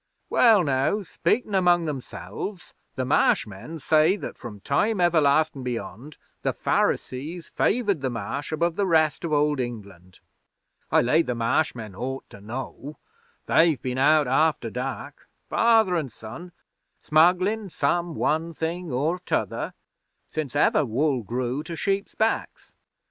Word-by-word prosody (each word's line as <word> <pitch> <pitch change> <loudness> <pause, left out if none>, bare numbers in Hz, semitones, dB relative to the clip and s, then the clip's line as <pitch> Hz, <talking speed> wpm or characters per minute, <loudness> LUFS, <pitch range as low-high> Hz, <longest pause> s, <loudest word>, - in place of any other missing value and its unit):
Well, 220 -6 +5
now, 140 +8 +1
speakin' 210 +4 -1
among 175 -3 +3
themselves, 155 +6 -6 0.2
the 130 -1 -2
Marsh 130 - +3
men 105 +11 -9
say 155 +4 +3
that - - -7
from 110 -5 -9
Time 205 - +1
Everlastin' 155 -4 +3
Beyond, 120 +3 -6 0.2
the - - 0
Pharisees 155 +7 -1
favoured 205 - +1
the 130 - -1
Marsh 120 +6 -4
above 165 +2 0
the 200 -1 +1
rest 160 -3 +2
of 170 - -3
Old 150 -1 +2
England. 100 -7 -7 0.7
I - - +5
lay 150 +7 +4
the 125 -6 -3
Marsh 115 +7 +1
men 110 -4 -8
ought 130 +7 -5
to 100 - -12
know. 135 +6 -7 0.5
They've 160 -4 +3
been 130 0 -3
out 150 +1 +4
after 145 -3 +1
dark, 135 +3 -6 0.2
father 225 -5 +3
an' 155 -6 -1
son, 115 +11 -10 0.5
smugglin' 185 +7 +3
some 170 +2 -1
one 160 +3 0
thing 165 +1 -4
or 150 +8 0
t'other, 180 - -2 0.5
since 145 -4 -5
ever 150 +1 +3
wool 135 +2 0
grew 125 +5 -2
to 165 +2 -7
sheep's 195 +3 -2
backs. 220 +1 -2
150 Hz, 140 wpm, -25 LUFS, 125-175 Hz, 0.7 s, Well